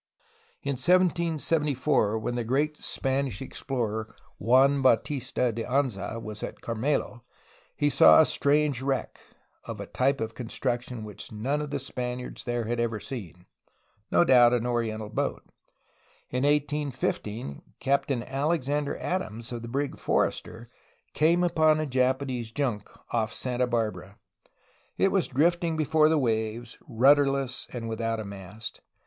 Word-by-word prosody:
In 140 -2 -2
1774 150 - +2
when 110 +2 -3
the 120 -1 -1
great 145 +6 0
Spanish 135 -5 -1
explorer 115 -5 -4 0.2
Juan 135 +3 +4
Bautista 125 0 +1
de 115 +1 -4
Anza 125 -5 -1
was 110 -1 -7
at - - -6
Carmelo 120 +1 -2 0.5
he 145 - +1
saw 140 -2 +7
a 160 - +7
strange 145 -3 +2
wreck, 135 -1 -2 0.5
of - - -6
a - - -5
type 135 +2 +1
of 110 0 -3
construction 120 0 -3
which 105 -2 -9
none 130 +8 -1
of 150 - -4
the 145 - -2
Spaniards 125 -2 -5
there 120 -1 -1
had 120 +1 -2
ever 115 -2 -1
seen 95 -9 -8 0.3
— 105 +2 -41
no - - +5
doubt, 125 -5 +6
an 120 -1 +1
oriental 115 -3 -1
boat. - - -2 0.9
In 125 +2 0
1815 145 - -1 0.2
Captain 135 -2 0
Alexander 145 +1 -1
Adams 115 -11 -3
of 120 -1 -4
the 115 - -7
brig 140 +3 -2
Forrester 115 +1 -1 0.5
came 170 +3 +3
upon 155 -3 +3
a 155 - 0
Japan 130 0 +1
ese 120 -3 -4
junk 120 -7 -2 0.2
off 110 -2 +1
Santa 125 +2 -1
Barbara. 105 -5 -2 0.8
It 195 - +3
was 195 -3 +2
drifting 165 +4 +1
before 155 0 +3
the 160 - +3
waves, 115 -2 -2
rudderless 135 0 +3
and 120 -2 -5
without 115 0 -2
a 110 - -5
mast. 100 +2 -8
125 Hz, 140 wpm, -27 LUFS, 115-145 Hz, 0.9 s, saw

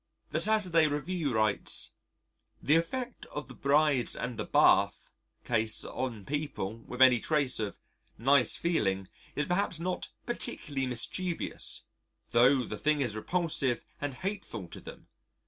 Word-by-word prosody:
The - - 0
Saturday 185 -7 +3
Review 150 +1 -1
writes: 110 -2 +1 0.7
The 150 - +3
effect 240 +9 -2
of 150 - -6
the - - -10
"Brides 140 -2 +3
and 125 0 -4
the - - -3
Bath" - - +3 0.3
Case 110 -2 +1
on 120 -6 -4
people 140 -8 -3
with 125 +1 +3
any 125 -2 +6
trace 140 -2 +1
of 105 -2 -3 0.4
nice 135 +2 +4
feeling 95 - 0 0.3
is 150 - 0
perhaps 180 -2 0
not 180 +2 -3 0.2
particularly 145 - -2
mischievous, 165 +9 -3 0.5
tho' 125 +3 +5
the 105 - -6
thing 150 -1 +2
is 120 -6 -1
repulsive 140 -2 0 0.2
and 145 -2 -3
hateful 190 - -5
to - - -8
them.... - - -11
140 Hz, 135 wpm, -30 LUFS, 120-165 Hz, 0.7 s, any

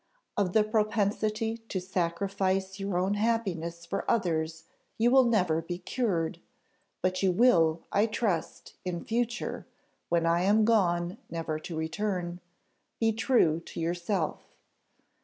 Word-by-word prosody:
Of 190 -3 0
the 220 - +5
propensity 215 +1 0
to 190 - -1
sacrifice 190 +2 -1
your 195 -2 -1
own 185 +3 +1
happiness 190 -7 -1
for 195 +3 -3
others 160 -6 0 0.3
you 235 +2 +3
will 265 -1 +6
never 180 -9 +2
be 175 +2 -5
cured, 185 -6 -1 0.6
but 185 0 +1
you 190 -2 +3
will, 170 -7 +4
I 205 +3 +3
trust, 210 -7 -2
in 175 -2 -4
future, 240 +1 -2 0.4
when 170 -1 +2
I 170 +1 +3
am 210 +3 +4
gone 180 -4 +2
never 165 -2 -3
to 160 +1 -6
return, 175 +1 -2 0.6
be 225 -1 +3
true 215 - +3
to 170 - -9
yourself. 175 +1 -1
190 Hz, 130 wpm, -29 LUFS, 170-215 Hz, 0.6 s, will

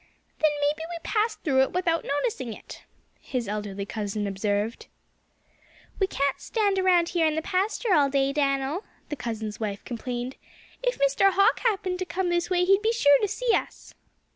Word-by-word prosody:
"Then 310 - +4
maybe 295 +2 +1
we 345 - -4
passed 435 0 -1
through 265 -4 +3
it 265 - +1
without 340 -2 +1
noticing 280 - -2
it," - - -12 0.3
his 250 -4 -4
elderly 205 -1 -4
cousin 205 -1 -3
observed. 205 +3 -2 1.1
"We 385 - +3
can't 280 -6 -1
stand 405 -4 0
around 355 -2 +3
here 335 -2 +2
in 310 - 0
the 320 - 0
pasture 395 +4 0
all 290 -4 +4
day, 275 0 +1
Dan'l," 275 +4 0 0.3
the 295 - -3
cousin's 220 -4 -5
wife 205 -3 -4
complained. 245 +1 -5 0.4
"If - - 0
Mr. 280 +8 +3
Hawk 400 +5 +4
happened 385 -6 0
to 370 - -2
come 365 0 -2
this 345 0 0
way 360 -1 +2
he'd 390 +2 +4
be 445 +1 +2
sure 285 -12 +5
to 415 - +2
see 485 +3 0
us." - - -3
300 Hz, 175 wpm, -26 LUFS, 245-380 Hz, 1.1 s, sure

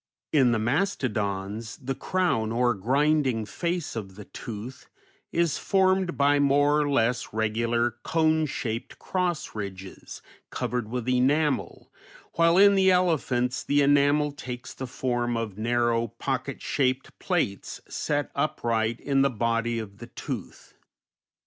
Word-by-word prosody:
In 130 -5 +5
the 115 - +2
mastodons 110 - -1
the 135 -1 -4
crown, 175 -12 0
or 120 +1 +2
grinding 130 +2 +1
face 170 - -3
of 95 -4 -6
the 105 0 -10
tooth, 115 +2 -8 0.4
is 170 -3 +1
formed 190 -4 +2
by 145 +1 +4
more 145 +1 +3
or 145 - 0
less 125 -2 +1
regular 115 +2 0 0.3
/\ 155 0 +3
shaped 115 -3 -4
cross 180 -4 -2
ridges, 95 -3 -8 0.3
covered 120 -3 -3
with 125 0 -4
enamel, 140 +4 +1 0.4
while 170 +1 +4
in 200 +1 +7
the 190 -1 +4
elephants 145 -9 +1
the 145 0 +2
enamel 145 +1 +3
takes 125 -3 -7
the 130 - -6
form 120 -1 -1
of 105 -3 -4
narrow, 120 0 +1
pocket 130 +4 -4
shaped 130 -1 -1
plates, 165 - -2
set 145 -1 -2
upright 115 -5 0
in 135 -1 +1
the 140 - +4
body 115 0 0
of 100 -3 -7
the - - -9
tooth. - - -7
125 Hz, 130 wpm, -26 LUFS, 115-150 Hz, 0.4 s, in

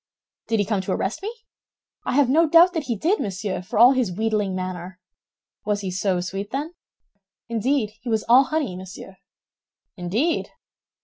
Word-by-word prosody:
"Did 225 - +1
he 205 - +1
come 200 -1 0
to 185 0 -2
arrest 195 - -2
me?" 420 +3 -4 0.7
"I - - -1
have 280 0 +4
no 315 +5 +3
doubt 340 +3 +7
that 320 -4 -2
he 240 - -1
did, 360 - +1
monsieur, 195 -2 -3
for 185 - -5
all 240 +4 +8
his 255 -7 +1
wheedling 210 -1 -1
manner." 185 0 -5 0.6
"Was 205 -1 -1
he 190 -2 -4
so 185 0 0
sweet, 195 +3 -5
then?" 290 +7 -4 0.8
"Indeed, 230 0 0
he 240 - -6
was 220 -2 +1
all 250 +4 +6
honey, 300 - -2
monsieur." 190 +1 -10 0.8
"Indeed!" 210 - -1
215 Hz, 170 wpm, -23 LUFS, 190-270 Hz, 0.8 s, all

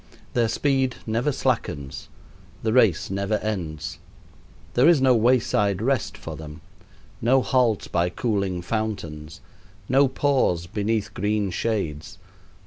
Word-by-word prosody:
Their 120 -2 +2
speed 130 +1 +1
never 115 +6 0
slackens, 70 - -2 0.5
the 110 -1 +1
race 110 -9 +3
never 100 +2 0
ends. 90 -9 -4 0.7
There 125 +5 +5
is 170 -4 +5
no 130 -1 +4
wayside 110 -4 +2
rest 125 +1 -1
for - - -7
them, 75 -1 -10 0.6
no 130 +3 +3
halt 125 -6 +1
by 85 +1 +1
cooling 100 -4 -1
fountains, 85 -8 -4 0.5
no 135 +2 +4
pause 130 - +1
beneath 105 +3 -2
green 105 -1 0
shades. 95 -4 -3
110 Hz, 120 wpm, -24 LUFS, 90-125 Hz, 0.7 s, There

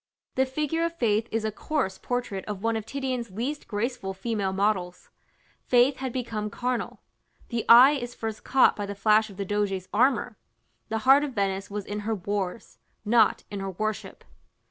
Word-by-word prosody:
The 265 0 +1
figure 305 +4 -1
of 335 0 -1
Faith 220 -5 +1
is 220 0 -1
a 220 - -1
coarse 235 -4 -2
portrait 245 -6 -3
of 205 -1 -6
one 230 0 +1
of 220 -1 -4
Titian's 260 -4 -3
least 250 +10 -4
graceful 210 -2 -3
female 200 -1 -2
models: 190 -2 -1 0.6
Faith 250 +2 +4
had 260 -1 -4
become 230 -4 -3
carnal. 245 +2 -3 0.5
The 235 -2 -2
eye 245 +4 +10
is 245 -4 -4
first 220 -1 -5
caught 265 - +4
by 205 -1 -4
the 200 - -5
flash 215 +2 +3
of 195 - -13
the 200 - -3
Doge's 195 -2 -1
armor. 245 -1 +2 0.5
The 225 - -1
heart 275 +2 +7
of 285 -3 -4
Venice 195 -1 -1
was 205 -1 -5
in 205 +1 -4
her 220 +2 -2
wars, 200 +1 -4 0.3
not 225 +2 +3
in 200 - -4
her 195 0 -3
worship. 215 +3 -4
220 Hz, 180 wpm, -26 LUFS, 200-250 Hz, 0.6 s, eye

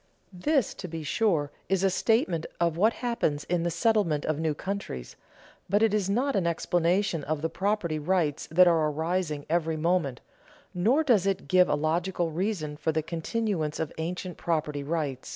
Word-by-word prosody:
This, 270 - +1
to 185 - -7
be 165 -2 -6
sure, 150 -3 +1 0.2
is 195 -1 +1
a 195 - +3
statement 190 -5 +1
of 170 -2 +1
what 210 +7 +4
happens 150 -12 0
in 175 -1 -1
the 170 - 0
settlement 175 -4 +1
of 155 -1 -1
new 160 -2 0
countries, 190 - -5 0.5
but 205 +4 +3
it 220 -2 +3
is 205 -3 +1
not 260 +7 +1
an 180 -3 +1
explanation 170 0 +1
of 155 0 -2
the 165 - +1
property 195 -6 -1
rights 160 -2 0
that 180 +3 +5
are 160 -3 +3
arising 160 -1 -2
every 160 -1 0
moment, 160 -5 0 0.5
nor 230 - +3
does 220 - +3
it 195 -1 -1
give 185 -1 +4
a - - +3
logical 170 +3 -1
reason 165 -4 -2
for 160 - 0
the 155 0 -1
continuance 165 -1 -2
of 160 - -3
ancient 180 +2 -4
property 155 -3 -1
rights. 140 -3 -3
170 Hz, 175 wpm, -27 LUFS, 155-195 Hz, 0.5 s, that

